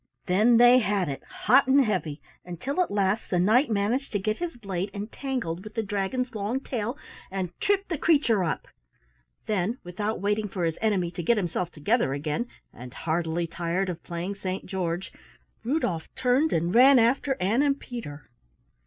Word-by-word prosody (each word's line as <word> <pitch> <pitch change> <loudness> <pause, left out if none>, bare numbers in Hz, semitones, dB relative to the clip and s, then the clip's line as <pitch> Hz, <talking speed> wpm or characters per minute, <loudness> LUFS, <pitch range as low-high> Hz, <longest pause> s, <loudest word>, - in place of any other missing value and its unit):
Then 215 +6 +4
they 245 +1 +7
had 200 -6 0
it 135 - -5
hot 370 -8 +3
and 270 0 +5
heavy 160 -8 -2 0.2
until 215 - -3
at 360 - 0
last 200 +1 0
the 180 - +1
knight 220 +10 +4
managed 220 +6 0
to 205 - +1
get 215 +2 -1
his 345 -6 -4
blade 195 -4 -3
entangled 210 -4 -4
with 215 0 -11
the 225 - 0
dragon's 205 +5 -2
long 215 +4 -2
tail, 240 -1 -3 0.3
and 185 -2 -3
tripped 400 -1 +1
the 330 -5 -2
creature 280 - +3
up. 165 - -2 0.8
Then, 210 +3 -1
without 205 +5 -3
waiting 210 +2 0
for 190 -3 -4
his 165 -1 -2
enemy 195 -6 +1
to 175 0 -5
get 230 +7 +2
himself 175 -2 -1
together 160 - 0
again 150 - -2 0.3
and 125 +1 -11
heartily 165 +1 -1
tired 170 +3 -2
of 170 -2 -5
playing 175 +3 -4
Saint 190 -1 -4
George, 180 -1 -3 0.5
Rudolf 225 - -1
turned 260 +5 +2
and 170 +2 0
ran 265 +3 +7
after 255 +3 +2
Ann 210 +8 +2
and 280 -1 +2
Peter. 150 - -8
205 Hz, 170 wpm, -26 LUFS, 175-245 Hz, 0.8 s, they